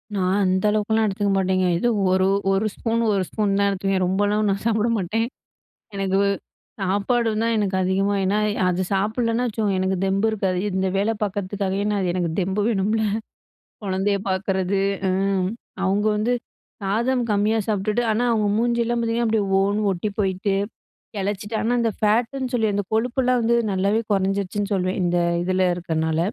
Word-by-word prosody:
நான் 185 Hz, -1 st, +1 dB
அந்த 185 Hz, +1 st, +1 dB
அளவுக்கெல்லாம் 215 Hz, +1 st, +1 dB
எடுத்துக்க 200 Hz, 0 st, 0 dB
மாட்டேங்க. 185 Hz, -1 st, +1 dB
எதோ 240 Hz, +8 st, +1 dB, 0.2 s
ஒரு 185 Hz, 0 st, +3 dB, 0.2 s
ஒரு 195 Hz, +2 st, +1 dB
ஸ்பூன் 230 Hz, 0 st, -1 dB
ஒரு 195 Hz, -2 st, +1 dB
ஸ்பூன் 205 Hz, -2 st, 0 dB
தான் 200 Hz, -, +3 dB
எடுத்துக்குவேன். 195 Hz, -1 st, 0 dB
ரொம்பலாம் 205 Hz, +3 st, +1 dB
ஒன்னும் 200 Hz, -2 st, 0 dB
சாப்பிட 225 Hz, 0 st, +2 dB
மாட்டேன். 215 Hz, +4 st, -1 dB, 0.7 s
எனக்கு 195 Hz, -1 st, 0 dB, 0.6 s
சாப்பாடு 205 Hz, +5 st, +1 dB
தான் 230 Hz, 0 st, +1 dB
எனக்கு 200 Hz, -2 st, 0 dB
அதிகமா, 195 Hz, +2 st, +1 dB
ஏனா 195 Hz, +2 st, +1 dB, 0.3 s
அது 180 Hz, 0 st, 0 dB
சாப்பிடலனா 225 Hz, +4 st, 0 dB
வச்சுக்கோங்க 215 Hz, -3 st, -1 dB
எனக்கு 190 Hz, 0 st, 0 dB
தெம்பு 195 Hz, +3 st, +1 dB
இருக்காது. 190 Hz, -4 st, -1 dB
இந்த 190 Hz, 0 st, 0 dB
வேலை 205 Hz, +3 st, +1 dB
பார்க்குறத்துக்காகவே 200 Hz, -1 st, -2 dB
நான் 205 Hz, -1 st, 0 dB
அது 180 Hz, -2 st, 0 dB
எனக்கு 175 Hz, -2 st, -1 dB
தெம்பு 190 Hz, +2 st, 0 dB
வேணும்ல? 220 Hz, 0 st, +1 dB, 0.8 s
குழந்தைய 195 Hz, +1 st, 0 dB
பார்க்குறது. 190 Hz, 0 st, 0 dB, 0.3 s
ஆ. -, -, +2 dB, 0.7 s
அவங்க 200 Hz, +2 st, +1 dB
வந்து 220 Hz, +4 st, +1 dB, 0.5 s
சாதம் 235 Hz, +6 st, 0 dB
கம்மியா 210 Hz, +2 st, +2 dB
சாப்டுட்டு, 215 Hz, +2 st, 0 dB
ஆனா 220 Hz, +3 st, 0 dB
அவங்க 215 Hz, -2 st, +1 dB
மூஞ்சி 235 Hz, +1 st, +1 dB
எல்லாம் 240 Hz, +1 st, -1 dB
பார்த்தீங்கன்னா 230 Hz, 0 st, 0 dB
அப்டியே 220 Hz, -2 st, +1 dB, 0.2 s
ஓனு 205 Hz, +2 st, +1 dB
ஒட்டி 190 Hz, +3 st, -2 dB
போயிட்டு, 195 Hz, 0 st, 0 dB, 0.7 s
எளச்சிட்டு. 205 Hz, +2 st, -3 dB
ஆனா, 230 Hz, -, 0 dB
அந்த 230 Hz, -1 st, +1 dB
ஃபேட்டுன்னு 245 Hz, +5 st, +1 dB
சொல்லி 225 Hz, -3 st, +1 dB
அந்த 205 Hz, 0 st, 0 dB
கொழுப்பெல்லாம் 250 Hz, +2 st, +1 dB
வந்து 235 Hz, +1 st, +2 dB, 0.2 s
நல்லாவே 200 Hz, +3 st, +1 dB
குறைஞ்சிடுச்சுன்னு 200 Hz, +1 st, -1 dB
சொல்லுவேன். 185 Hz, 0 st, -1 dB
இந்த 175 Hz, 0 st, +1 dB, 0.3 s
இதில 185 Hz, +1 st, +1 dB
இருக்கிறதுனால. 160 Hz, -2 st, -1 dB
200 Hz, 155 wpm, -23 LUFS, 190-220 Hz, 0.8 s, ஒரு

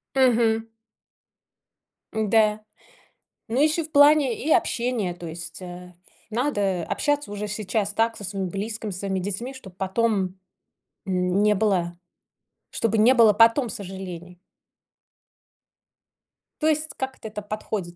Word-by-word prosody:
Мгм. 230 Hz, -4 st, +3 dB, 1.5 s
Н-да. 215 Hz, 0 st, +2 dB, 0.9 s
Ну, 245 Hz, +5 st, 0 dB
еще 310 Hz, +2 st, +2 dB
в 310 Hz, -, -11 dB
плане 285 Hz, -4 st, +5 dB
и 320 Hz, -, +1 dB
общения, 240 Hz, -, +1 dB
то 175 Hz, 0 st, -10 dB
есть, 165 Hz, +1 st, -8 dB
э, 180 Hz, 0 st, -9 dB, 0.4 s
надо 205 Hz, -, 0 dB
общаться 290 Hz, -6 st, -1 dB
уже 205 Hz, 0 st, -4 dB
сейчас 210 Hz, 0 st, -2 dB
так 225 Hz, +1 st, +1 dB
со 205 Hz, -, -9 dB
своим 190 Hz, -1 st, -3 dB
близким, 215 Hz, +2 st, -4 dB
со 185 Hz, -, -6 dB
своими 190 Hz, -1 st, -2 dB
детьми, 205 Hz, +8 st, -4 dB
чтоб 190 Hz, -9 st, -12 dB
потом, 190 Hz, -1 st, 0 dB, 0.7 s
м, 180 Hz, +1 st, +1 dB
не 210 Hz, 0 st, +4 dB
было 180 Hz, -4 st, 0 dB, 0.8 s
чтобы 225 Hz, -1 st, 0 dB
не 240 Hz, +4 st, +6 dB
было 230 Hz, -4 st, +6 dB
потом 230 Hz, +4 st, +5 dB
сожалений. 180 Hz, -3 st, -8 dB, 2.2 s
То 310 Hz, -, +2 dB
есть 310 Hz, 0 st, +1 dB
как 265 Hz, 0 st, -4 dB
это-то 210 Hz, -1 st, -7 dB
подходит? 205 Hz, -4 st, -5 dB
210 Hz, 125 wpm, -24 LUFS, 190-235 Hz, 2.2 s, не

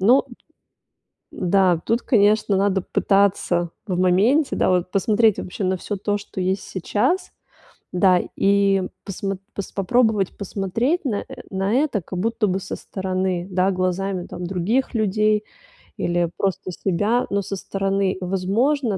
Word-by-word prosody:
Но 240 Hz, +8 st, +5 dB, 1.1 s
Да. 180 Hz, -2 st, +2 dB
Тут, 230 Hz, +2 st, +1 dB
конечно, 210 Hz, -3 st, +3 dB
надо 195 Hz, -1 st, +2 dB
пытаться 185 Hz, -4 st, +1 dB, 0.2 s
в 180 Hz, -1 st, -1 dB
моменте, 215 Hz, -, +3 dB
да, -, -, +2 dB
вот 180 Hz, 0 st, +1 dB
посмотреть 215 Hz, +2 st, +3 dB
вообще 185 Hz, +2 st, -5 dB
на 185 Hz, 0 st, +1 dB
всё 205 Hz, -, -4 dB
то, 205 Hz, +1 st, -1 dB
что 205 Hz, -2 st, -8 dB
есть 190 Hz, +1 st, 0 dB
сейчас, 210 Hz, -, -1 dB, 0.6 s
да. 180 Hz, 0 st, +4 dB, 0.2 s
И 200 Hz, -1 st, +3 dB, 0.2 s
посмо 195 Hz, 0 st, -3 dB, 0.2 s
пос 200 Hz, -, -5 dB
попробовать 215 Hz, -1 st, +1 dB
посмотреть 215 Hz, -, -1 dB
на 215 Hz, -6 st, -1 dB, 0.3 s
на 195 Hz, +3 st, 0 dB
это 270 Hz, -6 st, +1 dB
как 180 Hz, +3 st, -6 dB
будто 225 Hz, +2 st, 0 dB
бы 190 Hz, +1 st, -1 dB
со -, -, -5 dB
стороны, 185 Hz, -2 st, -2 dB
да, 185 Hz, +1 st, +2 dB
глазами, 185 Hz, 0 st, -1 dB
там, 180 Hz, -, -8 dB
других 195 Hz, +10 st, -1 dB
людей 215 Hz, 0 st, +2 dB, 0.5 s
или 175 Hz, -1 st, 0 dB
просто 190 Hz, -1 st, -2 dB
себя, 205 Hz, +7 st, 0 dB
но 200 Hz, 0 st, 0 dB
со 195 Hz, +1 st, -5 dB
стороны. 195 Hz, 0 st, -1 dB
Возможно, 200 Hz, +6 st, 0 dB
195 Hz, 140 wpm, -22 LUFS, 185-215 Hz, 1.1 s, Но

